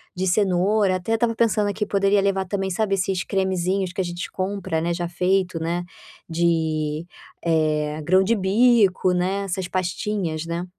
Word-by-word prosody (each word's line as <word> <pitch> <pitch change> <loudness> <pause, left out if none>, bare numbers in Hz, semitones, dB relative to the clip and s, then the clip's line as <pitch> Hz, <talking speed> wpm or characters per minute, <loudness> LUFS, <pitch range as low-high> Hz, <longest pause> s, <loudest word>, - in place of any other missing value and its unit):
de 185 +1 -1
cenoura, 190 +1 +2
até 185 +5 -3
eu - - +4
estava 230 0 +1
pensando 215 -3 +2
aqui, 210 +1 -2
poderia 200 0 +2
levar 195 -1 +1
também, 195 0 -2
sabe, 195 +2 0
esses 185 -1 -1
cremezinhos 190 -1 -1
que 195 - -1
a - - 0
gente 175 0 -5
compra, 190 -4 -2
né, 170 +1 0
já 175 0 -3
feito, 185 0 0
né, 175 +2 -2 0.4
de, 160 -2 0 0.4
eh, 155 -2 0
grão-de-bico, 190 +2 +3
né, 185 +3 0
essas 190 -1 -3
pastinhas, 180 -3 -2
né. 170 +1 -3
185 Hz, 155 wpm, -23 LUFS, 175-195 Hz, 0.4 s, eu